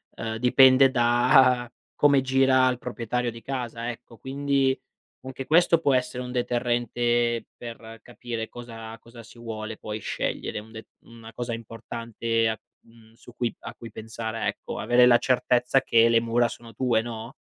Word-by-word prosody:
ehm, 110 Hz, 0 st, -4 dB
dipende 130 Hz, +2 st, +6 dB
da 125 Hz, 0 st, +3 dB, 0.2 s
come 140 Hz, -2 st, +4 dB
gira 130 Hz, 0 st, +3 dB
al 125 Hz, -1 st, 0 dB
proprietario 125 Hz, 0 st, -3 dB
di 115 Hz, 0 st, -11 dB
casa, 120 Hz, -3 st, -4 dB
ecco. 115 Hz, 0 st, -14 dB
Quindi 135 Hz, 0 st, 0 dB, 0.4 s
anche 130 Hz, 0 st, -7 dB
questo 170 Hz, +1 st, +4 dB
può 140 Hz, -4 st, +2 dB
essere 125 Hz, 0 st, -2 dB
un 125 Hz, -, -7 dB
deterrente 120 Hz, -1 st, 0 dB
per 115 Hz, -1 st, -10 dB
capire 120 Hz, -2 st, -6 dB
cosa 115 Hz, -2 st, -9 dB
cosa 115 Hz, 0 st, -14 dB
si 110 Hz, -, -17 dB
vuole 110 Hz, -1 st, -6 dB
poi 105 Hz, 0 st, -6 dB
scegliere, -, -, -4 dB
un 110 Hz, +1 st, -14 dB
de 110 Hz, -1 st, -10 dB
una 115 Hz, -1 st, -14 dB
cosa 120 Hz, -1 st, -4 dB
importante, 115 Hz, 0 st, -3 dB, 0.2 s
mhmm, 115 Hz, -1 st, -21 dB
su 120 Hz, +1 st, -17 dB
cui 120 Hz, -2 st, -2 dB
a -, -, -8 dB
cui 115 Hz, -, -10 dB
pensare 110 Hz, +1 st, -5 dB
ecco. -, -, -5 dB
Avere 125 Hz, 0 st, +4 dB
la 120 Hz, -1 st, +7 dB
certezza 125 Hz, +1 st, +2 dB
che 115 Hz, -2 st, +4 dB
le 115 Hz, -1 st, +4 dB
mura 120 Hz, +1 st, +1 dB
sono 115 Hz, 0 st, -11 dB
tue, 120 Hz, -4 st, +1 dB
no? 115 Hz, 0 st, -7 dB
120 Hz, 160 wpm, -25 LUFS, 115-125 Hz, 0.4 s, la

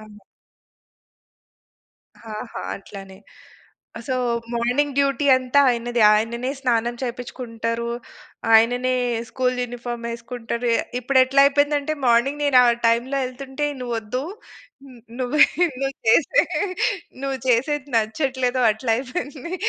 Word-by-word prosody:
అవును. 210 Hz, -1 st, -14 dB, 2.0 s
ఆ! 225 Hz, -, -13 dB, 0.3 s
ఆ! -, -, -7 dB
అట్లానే. 195 Hz, -1 st, -11 dB, 0.9 s
సో, 260 Hz, -, 0 dB, 0.4 s
మార్నింగ్ 250 Hz, +5 st, 0 dB
డ్యూటీ 280 Hz, +1 st, +1 dB
అంతా 255 Hz, +2 st, +2 dB
ఆయనదే. 240 Hz, -1 st, -1 dB
ఆయననే 235 Hz, +4 st, -1 dB
స్నానం 240 Hz, -2 st, 0 dB
చేపిచ్చుకుంటరు, 235 Hz, -2 st, -4 dB, 0.6 s
ఆయననే 245 Hz, +3 st, +4 dB, 0.4 s
స్కూల్ 255 Hz, -1 st, 0 dB
యూనిఫార్మ్ 240 Hz, -1 st, -6 dB
యేసుకుంటరు. 235 Hz, 0 st, -4 dB
ఎ -, -, +2 dB, 0.2 s
ఇప్పుడెట్లయిపోయిందంటే, 280 Hz, +3 st, +3 dB
మార్నింగ్ 255 Hz, +5 st, +2 dB
నేను 280 Hz, -3 st, +5 dB
ఆ -, -, +5 dB, 0.2 s
టైమ్‌లో 240 Hz, +4 st, 0 dB
యెళ్తుంటే, 265 Hz, +3 st, -4 dB
"నువ్వు 245 Hz, -1 st, -3 dB
ఒద్దు. 225 Hz, +4 st, -4 dB, 0.7 s
న్ 240 Hz, -, -15 dB, 0.2 s
నువ్వే, 255 Hz, +4 st, +3 dB, 0.4 s
నువ్వు 270 Hz, 0 st, -1 dB
చేసే 315 Hz, -, +4 dB, 0.8 s
నువ్వు 270 Hz, -1 st, -2 dB
చేసేది 270 Hz, +4 st, +1 dB
నచ్చట్లేదు" 255 Hz, +3 st, 0 dB
అట్లయిపోయింది. 255 Hz, +7 st, -3 dB
250 Hz, 100 wpm, -22 LUFS, 235-270 Hz, 2.0 s, నేను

